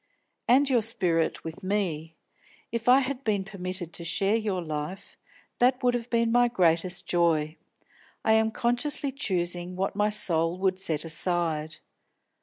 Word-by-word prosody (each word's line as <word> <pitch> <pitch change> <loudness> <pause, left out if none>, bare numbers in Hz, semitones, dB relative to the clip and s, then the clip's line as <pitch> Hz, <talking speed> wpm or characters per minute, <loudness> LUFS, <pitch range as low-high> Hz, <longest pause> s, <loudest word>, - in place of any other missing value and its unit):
"And 270 +4 +5
your 250 -4 +3
spirit 185 -8 0
with 160 0 -7
me. 175 -5 -2 0.6
If 235 +1 -1
I 260 +2 +7
had 270 0 -4
been 205 -4 0
permitted 185 -3 -5
to 170 - -7
share 195 +5 +1
your 205 -5 -1
life, 155 +4 -6 0.4
that 250 +1 +3
would 245 -1 +3
have 240 0 -3
been 230 -1 +1
my 245 +1 +4
greatest 180 -4 +1
joy. 160 -3 +1 0.7
I 220 - +4
am 220 0 +3
consciously 245 +5 0
choosing 180 -8 -2
what 195 +1 -2
my 210 +1 +2
soul 170 -5 +2
would 190 0 0
set 160 -4 0
aside. 160 -2 -2
190 Hz, 150 wpm, -27 LUFS, 170-235 Hz, 0.7 s, I